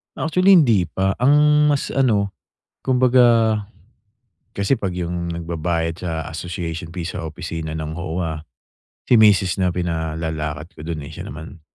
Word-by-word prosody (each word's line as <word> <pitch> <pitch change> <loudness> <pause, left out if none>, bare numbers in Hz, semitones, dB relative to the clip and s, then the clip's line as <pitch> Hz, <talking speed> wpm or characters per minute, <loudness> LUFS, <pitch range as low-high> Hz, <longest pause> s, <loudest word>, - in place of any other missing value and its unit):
Actually 180 +4 +4
hindi 115 - +4
pa. 95 +2 -1
Ang 150 +3 +4
mas 140 - -3
ano, 105 -7 +1 0.5
kumbaga 120 -4 +4 0.9
kasi 100 +6 +1
'pag 95 -5 -3
yung 85 -1 -3
nagbabayad 85 0 -2
sa - - -2 0.2
association 85 0 -5
fee 90 - -4
sa 85 - -5
opisina 80 0 -5
ng 80 +1 -5
OWWA, 80 -2 -4 0.6
si 120 -3 +4
misis 95 -3 +4
na 90 - +3
pinalalakad 80 -2 -3
ko 80 - -16
dun 80 -2 -5
eh. 75 - -10
Siya - - -8
naman 80 +3 -10
90 Hz, 140 wpm, -21 LUFS, 80-110 Hz, 0.9 s, Actually